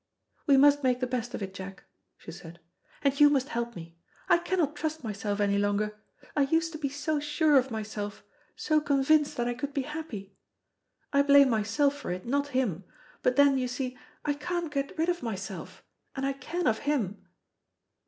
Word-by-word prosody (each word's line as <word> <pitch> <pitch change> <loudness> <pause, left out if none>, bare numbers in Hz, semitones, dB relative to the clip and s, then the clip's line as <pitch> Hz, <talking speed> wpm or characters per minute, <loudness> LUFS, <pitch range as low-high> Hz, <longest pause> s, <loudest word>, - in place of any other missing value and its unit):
"We 280 -2 +6
must 290 +1 +6
make 250 -2 +2
the 255 - 0
best 245 -1 -3
of - - -4
it, 190 -1 -6
Jack," 190 0 -8 0.3
she - - -10
said; 170 0 -11 0.4
"and 280 0 +1
you 295 0 +8
must 280 -1 +1
help 235 -3 -3
me. 170 0 -10 0.3
I - - +6
cannot 340 -4 0
trust 315 -1 -3
myself 205 -2 -3
any 200 -1 +2
longer. 205 +1 0 0.4
I 290 - +3
used 325 +3 +1
to 310 - -7
be 280 -3 -1
so 295 +2 -1
sure 295 +1 +2
of 265 -1 +4
myself, 210 -2 -5 0.3
so 310 -1 +1
convinced 290 +1 +2
that 240 0 0
I 245 - 0
could 280 +4 -5
be 275 - 0
happy. 260 -10 -7 0.8
I 280 - +5
blame 280 -2 +6
myself 225 +7 +1
for 290 - -7
it, 180 +1 -4
not 280 +4 0
him; 195 -9 0 0.4
but 250 - +2
then, 280 -1 +5
you 255 - -1
see, 250 +1 -4 0.3
I 295 - +2
can't 330 +2 -3
get 275 -1 -2
rid 325 +2 +1
of 350 0 0
myself, 200 -4 -6 0.3
and 270 0 -2
I 275 - 0
can 340 +6 -4
of 220 -2 +2
him. 235 -10 -1
270 Hz, 195 wpm, -28 LUFS, 215-290 Hz, 0.8 s, you